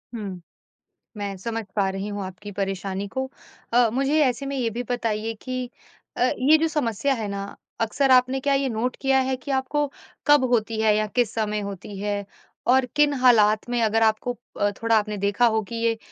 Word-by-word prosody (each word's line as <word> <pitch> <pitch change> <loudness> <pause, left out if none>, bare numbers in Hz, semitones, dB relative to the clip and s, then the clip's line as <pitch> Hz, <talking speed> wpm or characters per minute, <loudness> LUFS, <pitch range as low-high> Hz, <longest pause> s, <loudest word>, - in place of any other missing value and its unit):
हुँ। 195 -5 -6 0.8
मैं 200 -1 -4
समझ 225 +4 -4
पा 200 -2 +2
रही 195 +2 -4
हूँ 205 -1 -4
आपकी 190 +2 -8
परेशानी 195 0 -3
को। 265 +6 -3 0.4
अ, 240 0 +5
मुझे 275 +4 +1
ऐसे 255 +1 -1
में 275 0 -3
ये 240 -3 0
भी 235 +3 -3
बताइए 225 -2 -1
कि 255 -1 -4 0.5
अ, - - 0 0.2
ये 285 +5 +6
जो 325 - +2
समस्या 280 -4 0
है 225 -4 -3
ना 200 0 -4 0.4
अक्सर 255 +5 +1
आपने 255 +1 +5
क्या 280 +1 +1
ये 275 0 +1
नोट 240 +2 -2
किया 270 -1 +3
है 260 0 0
कि 255 +2 -9
आपको 270 +2 0 0.4
कब 290 -2 +6
होती 225 -2 +1
है 215 -1 +4
या 215 0 +1
किस 235 +1 0
समय 210 -1 -1
होती 200 0 -7
है 205 0 -2 0.5
और 260 0 +4
किन 295 0 +4
हालात 220 -3 +4
में 245 -1 +1
अगर 225 0 +2
आपको 220 +2 +1 0.5
थोड़ा 230 0 +3
आपने 210 0 -3
देखा 200 +4 +2
हो 220 -1 +2
कि 235 - -7
ये 230 -1 +1
230 Hz, 195 wpm, -24 LUFS, 210-260 Hz, 0.8 s, ये